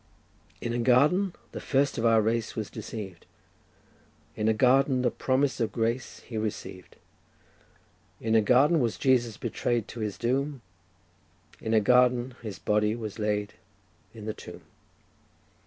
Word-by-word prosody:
"In 120 - -2
a 120 - -1
garden 150 +11 +3 0.2
the - - -6
first 140 -2 0
of 115 - +2
our 110 -1 +4
race 115 +1 -1
was 110 -2 -4
deceived; 95 -6 -8 1.1
In 105 - -1
a 110 - +4
garden 130 +2 +3
the 120 - +2
promise 135 +1 0
of 115 -3 0
grace 115 +3 -2
he 115 - -7
received; 100 -4 -6 1.2
In 110 0 -1
a 110 - +6
garden 135 +9 +4
was 120 -4 0
Jesus 120 -5 +2
betray'd 120 -1 -2
to 120 - -8
His 105 -4 -3
doom; 135 +4 -1 1.0
In 110 0 -1
a - - +6
garden 125 +2 +3
His 105 -5 -6
body 105 +2 +1
was 110 -2 -6
laid 105 -1 -1 0.6
in 110 -2 -10
the 110 - -3
tomb." - - -11
115 Hz, 145 wpm, -27 LUFS, 110-130 Hz, 1.2 s, a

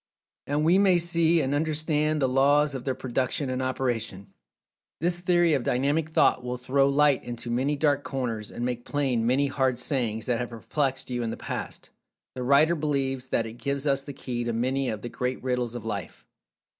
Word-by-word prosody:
And 145 +2 0
we 175 +4 +5
may 190 -3 +5
see 170 -1 +3
and 135 0 -1
understand 155 0 0
the - - +4
laws 145 +3 +3
of 130 -2 -6
their 130 -2 -1
production 130 +2 -2
and 130 0 -2
operation. 120 -7 -3 0.7
This 175 +2 0
theory 175 -2 +3
of 140 - +2
Dynamic 145 +6 0
Thought 130 -4 +3
will 125 0 -3
throw 135 +2 +2
light 145 -1 +3
into 120 0 -6
many 135 +5 +1
dark 145 -1 +1
corners, 115 -6 -3
and 120 - -4
make 120 -1 -3
plain 130 -6 0
many 135 +3 +3
"hard 130 -2 0
sayings" 120 -4 -1
that 120 -2 0
have 125 - -3
perplexed 130 +3 -2
you 120 -1 -1
in 115 - -2
the - - -5
past. - - -6 0.4
The 130 - -6
writer 140 +6 +4
believes 135 -4 -1
that 115 - +1
it 115 +1 -9
gives 140 0 -2
us 140 -1 +2
the 140 - -8
key 125 -3 -4
to 120 0 -2
many 130 +3 0
of 110 -1 -5
the 120 - -4
great 125 +1 -3
Riddles 125 -2 -1
of 120 - -6
Life. 100 - -5
135 Hz, 195 wpm, -26 LUFS, 125-145 Hz, 0.7 s, we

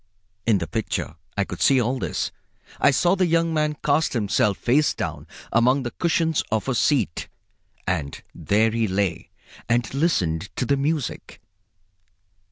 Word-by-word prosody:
In 110 -3 +5
the 85 - -2
picture 110 +7 -3 0.2
I - - +3
could - - -7
see 135 -2 +5
all 125 +2 0
this. - - -2 0.5
I - - +5
saw 175 +6 +3
the 185 -2 +2
young 165 0 +2
man 150 -1 0
cast 150 +2 +2
himself 105 -3 +1
face 145 +5 +2
down - - -4 0.3
among 125 +4 +3
the 120 - -4
cushions 165 -2 +1
of 110 +3 0
a 135 - +1
seat, 120 - +1 0.6
and 80 -6 -2
there 110 +2 +2
he 115 0 0
lay 95 -2 -1 0.4
and 120 0 +1
listened 100 - 0
to - - -1
the 140 - +2
music. 145 0 -2
125 Hz, 155 wpm, -23 LUFS, 105-150 Hz, 0.6 s, In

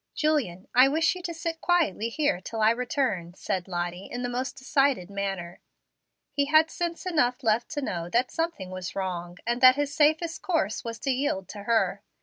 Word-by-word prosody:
"Julian, 265 - 0
I 255 +2 +7
wish 315 +3 +2
you 365 - -8
to 345 - -4
sit 330 0 -4
quietly 315 - +1
here 285 -7 0
till 225 +4 -6
I 215 +1 +5
return," 235 - -1
said 190 -2 -3
Lottie, 175 +1 -4
in 245 +1 -5
the 245 - -1
most 255 +2 -3
decided 265 - +1
manner. 195 -3 -4 0.7
He 280 - +1
had 310 +2 +4
sense 340 +1 -3
enough 280 -8 +1
left 225 +1 +1
to 290 -2 -3
know 170 -8 -3
that 245 +6 +1
something 325 - -3
was 185 -1 -6
wrong, 175 -2 -4
and 240 +1 -1
that 255 0 +9
his 290 0 -1
safest 315 +2 +2
course 315 - -1
was 230 -1 -5
to 275 - 0
yield 255 -8 -1
to 205 -1 -8
her. 230 0 +1
245 Hz, 190 wpm, -27 LUFS, 190-295 Hz, 0.7 s, that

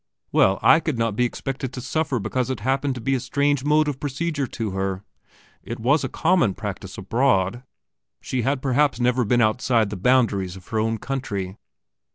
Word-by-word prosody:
Well, 95 0 +4
I 160 - +7
could 155 -6 -2
not 115 -2 0
be 125 - +2
expected 130 +1 -4
to 125 - -5
suffer 135 +2 -1
because 125 +4 -2
it 130 - -3
happened 135 +1 0
to 125 - -6
be 135 +4 0
a 130 - +1
strange 140 +2 0
mode 150 +1 +3
of 140 -3 -3
procedure 145 0 -2
to 115 -4 -4
her. 95 0 -2 0.6
It 115 - -7
was 135 +6 +2
a 130 - -2
common 165 - +2
practice 100 -2 -6
abroad. 115 0 +1 0.6
She 130 - -2
had 135 +2 -1
perhaps 135 -1 +2
never 125 +1 +2
been 120 +3 +2
outside 110 -1 +2
the 105 - -4
boundaries 100 -4 +2
of 95 -1 -13
her 110 - 0
own 115 +1 0
country? 100 -8 -4
125 Hz, 190 wpm, -23 LUFS, 110-135 Hz, 0.6 s, I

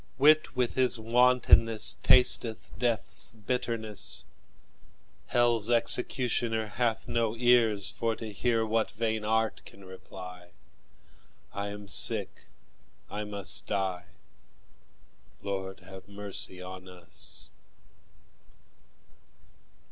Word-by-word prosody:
Wit 150 +2 +4
with 125 -2 0
his 130 -2 +3
wantonness 115 -1 +4
Tasteth 120 -3 +3
death's 120 -1 +1
bitterness; 110 -2 -3 1.0
Hell's 120 -2 +2
executioner 120 -1 +1
Hath 115 +1 -2
no 115 -1 -1
ears 115 -4 +3
for 115 -1 -2
to 110 -2 -8
hear 115 +1 0
What 110 +1 0
vain 110 -1 -3
art 110 +1 -1
can 100 - -15
reply; 90 -1 -11 1.0
I 100 0 -4
am 100 0 -8
sick, 95 - +3 0.7
I 105 0 -4
must 95 -12 -1
die 95 -3 -2 1.4
Lord, 95 -1 -5
have 95 0 -13
mercy 100 -2 -6
on 95 0 -10
us! 90 -1 -9
110 Hz, 95 wpm, -28 LUFS, 95-120 Hz, 1.4 s, Wit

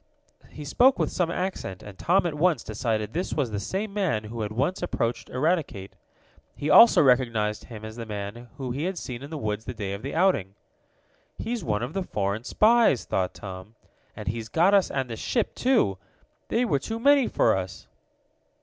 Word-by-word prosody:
He 150 - -9
spoke 255 - +4
with - - 0
some 175 -3 0
accent, 175 - -4
and 100 -2 -10
Tom 180 - +2
at 170 - -1
once 165 +2 +2
decided 110 0 -2
this 175 +4 -2
was 135 -7 -1
the 105 - -2
same 195 - -3
man 185 - 0
who 110 +2 -6
had 105 -1 -3
once 135 +11 -1
approached 120 -9 -2
Eradicate. 135 - -1 0.6
He 150 - -2
also 230 -8 +8
recognized 115 -5 +2
him 110 -3 -9
as 110 +1 -9
the 115 -1 -6
man 105 +3 -6
he 135 +2 -3
had 185 0 -2
seen 125 -6 -6
in 140 - -8
the 160 - -5
woods 110 -4 -3
the 125 - -6
day 100 -3 -4
of 100 - -6
the 140 +5 -5
outing. 160 - +2 0.8
"He's 230 -3 -3
one 105 -1 -1
of 125 +5 -5
the 195 - -1
foreign 105 - -2
spies," 225 - +4
thought 95 -1 -1
Tom 95 +2 -9 0.4
"and - - -8
he's 115 0 -3
got 175 - +3
us 195 -2 +4
and 135 -2 -2
the 115 - -5
ship, 230 - -1
too. 230 - +2 0.5
They 240 +2 +1
were 145 - +1
too 225 +11 -5
many 280 +1 +5
for - - +2
us!" 95 0 -5
125 Hz, 195 wpm, -26 LUFS, -, 0.8 s, also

